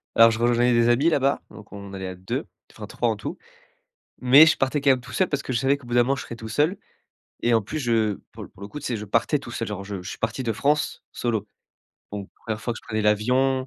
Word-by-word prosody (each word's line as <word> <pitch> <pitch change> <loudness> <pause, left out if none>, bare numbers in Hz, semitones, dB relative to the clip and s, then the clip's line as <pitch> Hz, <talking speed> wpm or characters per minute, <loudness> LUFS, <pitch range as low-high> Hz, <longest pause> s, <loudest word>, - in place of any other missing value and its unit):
Alors 115 0 +8
je 110 - -3
rejoignais 120 +1 +3
des 115 0 +4
amis 140 +8 +4
là-bas, 140 -3 +1
donc 105 -2 -13
on 100 -1 -9
allait 95 -1 -5
à 95 - -6
2, 95 +1 -4 0.3
enfin - - -8
3 - - -1
en - - 0
tout. - - -6 0.8
Mais 135 +5 +8
je 160 - +4
partais 135 +2 0
quand 140 0 +3
même 130 - +3
tout 125 +1 -12
seul 185 - +1
parce 140 -1 -2
que - - -4
je 120 - +1
savais 135 +3 +2
qu'au 140 - -15
bout 120 - -4
d'un 120 - +6
moment, 135 +3 +1
je - - -5
serais 115 - -8
tout 110 -1 -8
seul 155 - +1 0.7
et 120 0 +2
en 115 - +4
plus, 155 +10 -5
je 110 -5 +1 0.2
pour - - -9
le - - -11
pour - - -20
le 100 - -6
coup, 150 - -7
tu - - -9
sais, 120 - -1
je 105 - -6
partais 115 +8 +1
tout 120 -4 -10
seul. 115 -2 -3
Genre 100 -2 -5
je 100 -2 -6
je 90 - -7
suis - - -7
parti 115 +3 -2
de 115 - 0
France 145 +6 0
solo. 110 -4 -2 0.7
Donc 100 -2 -5
1ère 110 -1 -5
fois 120 - -2
que 115 - -8
je - - -23
prenais 110 0 -1
l'avion. 125 +6 +3
120 Hz, 280 wpm, -24 LUFS, 105-135 Hz, 0.8 s, Alors